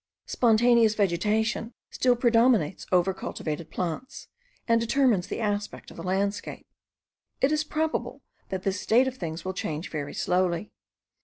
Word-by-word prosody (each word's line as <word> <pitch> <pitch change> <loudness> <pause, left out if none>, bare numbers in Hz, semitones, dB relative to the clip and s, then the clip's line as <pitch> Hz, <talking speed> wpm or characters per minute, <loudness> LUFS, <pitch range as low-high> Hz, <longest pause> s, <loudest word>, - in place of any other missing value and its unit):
Spontaneous 235 -1 +4
vegetation 215 +4 0 0.2
still 250 -1 +2
predominates 235 - +2
over 185 +1 +3
cultivated 160 -3 -5
plants, 180 - -5 0.4
and 230 -1 +3
determines 230 -5 +2
the - - -4
aspect 205 -2 -3
of - - -13
the - - -6
landscape. 195 +3 -2 0.7
It 270 - +3
is 305 0 +1
probable 315 +1 -2 0.3
that 190 -1 -4
this 195 -1 -1
state 245 +4 +4
of 260 0 -4
things 165 -3 -5
will 185 - -2
change 160 -2 -4
very 145 -2 -4
slowly. 180 +1 0
210 Hz, 140 wpm, -27 LUFS, 180-240 Hz, 0.7 s, Spontaneous